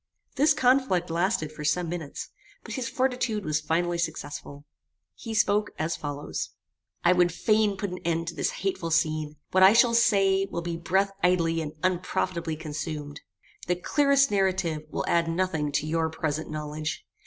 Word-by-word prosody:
This 290 Hz, +2 st, +4 dB
conflict 250 Hz, -, +2 dB
lasted 170 Hz, -2 st, 0 dB
for 150 Hz, -1 st, -8 dB
some 170 Hz, +4 st, +1 dB
minutes, 160 Hz, -4 st, -5 dB, 0.3 s
but -, -, -7 dB
his 255 Hz, -4 st, -3 dB
fortitude 250 Hz, -5 st, -1 dB
was 155 Hz, 0 st, 0 dB
finally 170 Hz, +2 st, 0 dB
successful. 145 Hz, -3 st, -5 dB, 0.5 s
He 225 Hz, -2 st, -7 dB
spoke 210 Hz, 0 st, +2 dB
as 160 Hz, +2 st, -1 dB
follows: 145 Hz, 0 st, -4 dB, 0.5 s
"I 175 Hz, -, +5 dB
would 175 Hz, -1 st, +3 dB
fain 210 Hz, +2 st, +2 dB
put 200 Hz, -1 st, -3 dB
an 180 Hz, -, -5 dB
end 165 Hz, 0 st, -1 dB
to -, -, -7 dB
this -, -, 0 dB, 0.2 s
hateful 185 Hz, -3 st, -1 dB
scene: 155 Hz, -2 st, 0 dB, 0.2 s
what 185 Hz, -, +3 dB
I 190 Hz, +2 st, +9 dB
shall 235 Hz, 0 st, +5 dB
say, 195 Hz, -4 st, +3 dB
will 170 Hz, -1 st, -4 dB
be 170 Hz, 0 st, -3 dB
breath 190 Hz, +4 st, +1 dB
idly 165 Hz, -2 st, +2 dB
and 150 Hz, -1 st, -5 dB
unprofitably 175 Hz, -2 st, -1 dB
consumed. 150 Hz, -1 st, -5 dB, 0.5 s
The 180 Hz, -, +2 dB
clearest 275 Hz, -, +3 dB
narrative 185 Hz, -6 st, 0 dB
will -, -, -3 dB
add 170 Hz, -1 st, +2 dB
nothing 165 Hz, -3 st, -1 dB
to 145 Hz, -, 0 dB
your 160 Hz, +1 st, 0 dB
present 155 Hz, -1 st, -3 dB
knowledge. 155 Hz, 0 st, -4 dB
170 Hz, 165 wpm, -27 LUFS, 155-195 Hz, 0.5 s, I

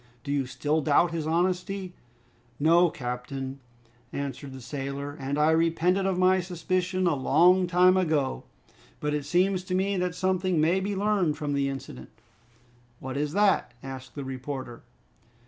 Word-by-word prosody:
Do 140 Hz, -, -4 dB
you 140 Hz, -2 st, 0 dB
still 145 Hz, +4 st, -1 dB
doubt 155 Hz, +3 st, +3 dB
his 160 Hz, -2 st, -3 dB
honesty?" 180 Hz, +2 st, -1 dB, 0.7 s
"No, 170 Hz, +4 st, +5 dB
captain," 130 Hz, +1 st, -5 dB, 0.5 s
answered 140 Hz, 0 st, -5 dB
the 130 Hz, -, -9 dB
sailor, 140 Hz, +2 st, -5 dB
"and 140 Hz, +1 st, -2 dB
I 150 Hz, +1 st, +4 dB
repented 165 Hz, +4 st, +2 dB
of 190 Hz, -2 st, 0 dB
my 185 Hz, +1 st, +4 dB
suspicion 185 Hz, +1 st, -1 dB
a 170 Hz, -, +3 dB
long 175 Hz, +7 st, +4 dB
time 180 Hz, +1 st, +5 dB
ago! 155 Hz, -, 0 dB, 0.6 s
But 150 Hz, 0 st, -1 dB
it 150 Hz, -2 st, -2 dB
seems 185 Hz, +4 st, +1 dB
to 185 Hz, -, -2 dB
me 195 Hz, +1 st, 0 dB
that 180 Hz, -2 st, -1 dB
something 185 Hz, -2 st, 0 dB
may 165 Hz, +5 st, +3 dB
be 200 Hz, +1 st, -2 dB
learned 195 Hz, -6 st, +1 dB
from 145 Hz, -1 st, -2 dB
the 140 Hz, -1 st, +1 dB
incident." 135 Hz, -1 st, -8 dB, 0.9 s
"What 130 Hz, 0 st, -6 dB
is 145 Hz, +1 st, -2 dB
that?" 200 Hz, -11 st, +2 dB
asked 130 Hz, -2 st, -8 dB
the 140 Hz, -, -5 dB
reporter. 130 Hz, -2 st, -6 dB
160 Hz, 155 wpm, -27 LUFS, 140-185 Hz, 0.9 s, No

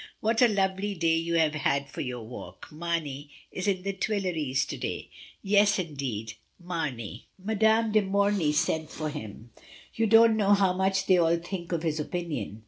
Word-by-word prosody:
What 225 Hz, +2 st, +1 dB
a 245 Hz, -, +8 dB
lovely 195 Hz, -1 st, 0 dB
day 165 Hz, -2 st, +2 dB
you 170 Hz, +1 st, -1 dB
have 160 Hz, -2 st, +3 dB
had 140 Hz, -2 st, 0 dB
for -, -, -6 dB
your 125 Hz, -3 st, -4 dB
walk! 120 Hz, +2 st, -10 dB
Mamey 155 Hz, -3 st, -3 dB, 0.2 s
is 185 Hz, +2 st, -4 dB
at 190 Hz, -2 st, 0 dB
the 195 Hz, 0 st, -2 dB
Tuileries 180 Hz, -10 st, -1 dB
to -, -, -5 dB
day. -, -, -5 dB, 0.3 s
Yes, 205 Hz, 0 st, +4 dB
indeed, 135 Hz, -, -4 dB, 0.3 s
M. 175 Hz, 0 st, -16 dB
I20 135 Hz, -, -4 dB, 0.2 s
MRS. 220 Hz, -1 st, -2 dB
DYMOND. 220 Hz, 0 st, +3 dB
de 215 Hz, -, +5 dB
Morny 200 Hz, -4 st, +1 dB
sent 155 Hz, +1 st, 0 dB
for 155 Hz, -1 st, -4 dB
him. 115 Hz, -5 st, -9 dB, 0.4 s
You 225 Hz, 0 st, +1 dB
don't 225 Hz, +1 st, +6 dB
know 205 Hz, -1 st, +4 dB
how 195 Hz, -2 st, +2 dB
much 190 Hz, 0 st, +1 dB
they 185 Hz, -2 st, +4 dB
all 170 Hz, 0 st, +3 dB
think 170 Hz, 0 st, -6 dB
of 170 Hz, -1 st, -1 dB
his 160 Hz, -2 st, -1 dB
opinion. 150 Hz, -, -4 dB
170 Hz, 185 wpm, -28 LUFS, 150-200 Hz, 0.4 s, a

